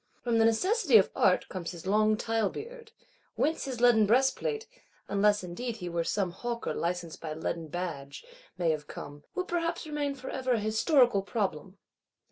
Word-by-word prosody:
From 235 -2 +2
the 225 - +5
necessities 315 - +4
of 195 - +3
Art 185 - +3
comes 175 -3 -5
his 170 -1 -9
long 215 +2 +3
tile 225 -3 0
beard; 465 - -9 0.4
whence 315 0 0
his 260 -3 -4
leaden 235 -3 +5
breastplate 270 - +1 0.4
(unless 205 0 +2
indeed 220 +7 -5
he 180 -4 -5
were 170 0 -1
some 185 +2 -1
Hawker 235 +6 -4
licensed 170 -1 -3
by 155 -2 -5
leaden 160 0 -3
badge) 155 - -5 0.3
may 170 -2 +2
have 150 -1 -4
come,—will 145 - -7
perhaps 340 -2 -2
remain 295 -2 -2
for 265 - -7
ever 260 -1 0
a 230 - +1
Historical 220 +1 +3
Problem. 195 -3 -3
215 Hz, 165 wpm, -29 LUFS, 175-265 Hz, 0.4 s, the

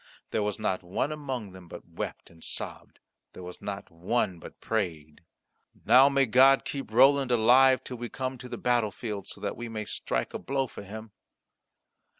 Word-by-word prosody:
There 110 - 0
was 105 -1 -1
not 100 -4 -1
one 95 +11 -2
among 135 -9 -5
them 90 -1 -13
but - - -11
wept - - -6
and 80 -1 -14
sobbed; - - -5 0.4
there 90 - -10
was 90 0 -9
not 100 -2 -6
one 90 +2 -1
but - - -12
prayed, 80 -9 -3 0.6
"Now, 135 +2 +7
may 140 -1 +3
God 130 +3 +5
keep 140 -5 -5
Roland 135 +3 +5
alive 125 +2 +5
till 125 - -6
we 120 0 -5
come 130 -1 -4
to 125 - -9
the - - -5
battlefield, 110 -4 -1
so - - -9
that - - -3
we 120 -1 -6
may 110 -1 -4
strike - - -3
a - - -4
blow 135 0 -1
for 125 - -10
him." 110 +2 -9
115 Hz, 180 wpm, -28 LUFS, 95-130 Hz, 0.6 s, Now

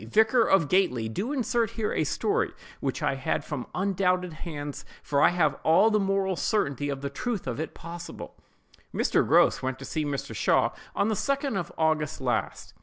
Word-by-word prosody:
vicar 220 - +3
of 195 -8 +3
Gately, 135 -11 +2
do 195 - -3
insert 240 -5 0
here 215 -2 -1
a - - +1
story 440 +2 0 0.3
which - - -3
I - - +2
had - - -2
from - - -5
undoubted 185 -2 +1
hands; 145 -3 -6 0.2
for 140 -1 +1
I - - +7
have 165 -5 +1
all 190 +8 +5
the 215 - +3
moral 195 -1 +1
certainty 145 - 0
of 140 -1 -3
the 140 - -3
truth 225 - -3
of 125 0 -3
it 160 - -4
possible:— 170 +1 -8 0.6
"Mr. - - +2
Grose - - +4
went 130 -1 -2
to 135 - -9
see 155 - -2
Mr. 145 -2 -4
Shaw - - +3 0.2
on 200 - +2
the - - +1
2d 275 +4 -1
of 185 -3 -3
August 155 -2 +1
last. 125 -2 -2
175 Hz, 185 wpm, -27 LUFS, 145-210 Hz, 0.6 s, I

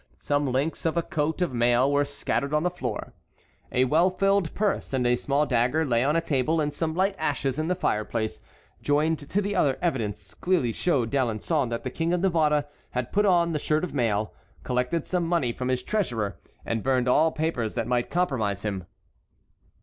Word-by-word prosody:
Some 145 0 0
links 140 +6 -1
of 165 - -1
a 170 - +2
coat 160 +1 -1
of 170 - -2
mail 120 +3 +3
were 145 0 +3
scattered 140 0 -2
on 150 - +2
the 180 - +1
floor. 125 -12 -5 0.6
A 125 - +3
well 160 +8 +4
filled 195 -1 +1
purse 205 -8 -1
and 130 -2 +1
a 120 0 +4
small 140 +4 +1
dagger 130 +5 +1
lay 120 -3 +2
on 145 +3 +2
a 165 - +3
table, 155 +1 +1
and 150 -1 0
some 160 +1 -2
light 190 +2 +2
ashes 145 -2 -1
in 155 - -1
the 180 - +1
fireplace, 110 - -2 0.4
joined 150 0 0
to 200 - +1
the 205 +1 -2
other 135 -2 +2
evidence, 105 - -2
clearly 170 -10 +1
showed 125 -4 0
D'Alençon 130 +2 0
that 115 0 -3
the 130 - -4
King 165 +4 -1
of 180 - +1
Navarre 155 -5 +2 0.2
had 125 -1 -3
put 205 +1 +2
on 170 -2 +3
the 155 - -1
shirt 155 +3 0
of 180 - -3
mail, 110 -5 0 0.3
collected 125 +6 -1
some 175 -2 -1
money 165 -9 +1
from 125 +1 -4
his 130 -1 0
treasurer, 120 - -2 0.3
and 115 -1 -1
burned 130 0 +1
all 155 +6 +4
papers 155 -9 -2
that - - -1
might 120 -1 0
compromise 120 - 0
him. 95 -4 -3
145 Hz, 195 wpm, -26 LUFS, 125-165 Hz, 0.6 s, well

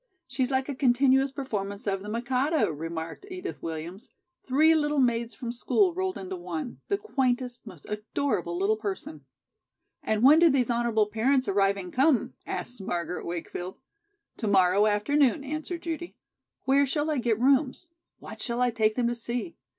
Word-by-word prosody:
"She's 260 -1 -1
like 265 -1 0
a 285 - -3
continuous 265 +1 +3
performance 205 -7 -4
of 195 -2 -1
'The 205 - -7
Mikado,'" 255 - 0
remarked 165 - -6
Edith 370 +1 -6
Williams. 165 +5 -6 0.4
"Three 305 +5 +5
little 295 -2 +1
maids 235 -3 +1
from 235 -2 -5
school 355 - +2
rolled 375 +1 -2
into 190 -1 -6
one, 175 +4 -6
the 400 - +1
quaintest, 255 - -2
most 180 -7 -12
adorable 210 -4 -2
little 200 +4 +1
person." 190 - -6 0.8
"And 220 +1 0
when 295 +5 +8
do 335 0 +6
these 260 -4 +2
honorable 235 -2 +2
parents 245 +5 +1
arriving 195 -2 +1
come?" 270 0 +2
asked 245 -3 -5
Margaret 175 -2 -3
Wakefield. 175 +2 -5 0.6
"To 220 - -3
morrow 195 +1 +4
afternoon," 270 +7 +2
answered 310 +4 -5
Judy. 340 +1 -5 0.5
"Where 275 +1 +3
shall 295 +3 0
I 295 - 0
get 230 -3 0
rooms? 270 +5 +2 0.3
What - - -10
shall 235 -1 -2
I 250 -1 +3
take 220 -1 +1
them 245 - +1
to 240 - +1
see? 240 +7 -4
240 Hz, 160 wpm, -27 LUFS, 200-280 Hz, 0.8 s, when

